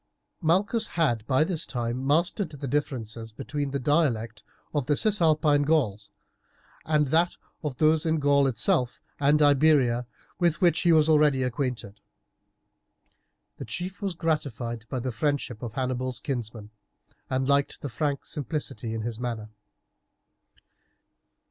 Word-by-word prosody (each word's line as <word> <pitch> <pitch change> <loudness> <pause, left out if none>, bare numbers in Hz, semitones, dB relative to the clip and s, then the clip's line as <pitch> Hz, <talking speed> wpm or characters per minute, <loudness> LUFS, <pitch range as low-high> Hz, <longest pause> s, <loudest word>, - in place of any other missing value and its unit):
Malchus 200 +7 +2
had 120 -10 +2
by 130 +2 +3
this 165 -1 -1
time 120 +1 -3
mastered 170 +5 +1
the 145 -2 -7
differences 115 -5 -3
between 140 +4 -4
the 140 - -2
dialect 125 -7 0 0.3
of 145 -5 -1
the 145 -1 +2
Cisalpine 155 -8 +3
Gauls 125 -10 0 0.8
and 150 -1 +2
that 170 +4 +2 0.3
of 145 -4 -4
those 155 0 +3
in 160 0 +1
Gaul 140 -1 +3
itself 120 +1 +1 0.2
and 150 +1 +4
Iberia, 140 -5 +3 0.3
with 170 -2 +2
which 175 -3 +3
he 175 - +3
was 155 -1 +5
already 150 -4 +4
acquainted. 125 -5 -3 1.6
The - - -7
chief 185 +3 -5
was 195 -3 -2
gratified 125 -8 -2
by 130 - -3
the 130 +1 -3
friendship 130 -2 -2
of 115 -3 -6
Hannibal's 130 0 -2
kinsman, 115 -6 -5 0.6
and 130 0 0
liked 140 0 +1
the - - -4
frank 140 +4 -2
simplicity 135 -5 -3
of 110 - -3
his 115 0 -4
manner. 115 -3 -4
140 Hz, 135 wpm, -26 LUFS, 120-155 Hz, 1.6 s, was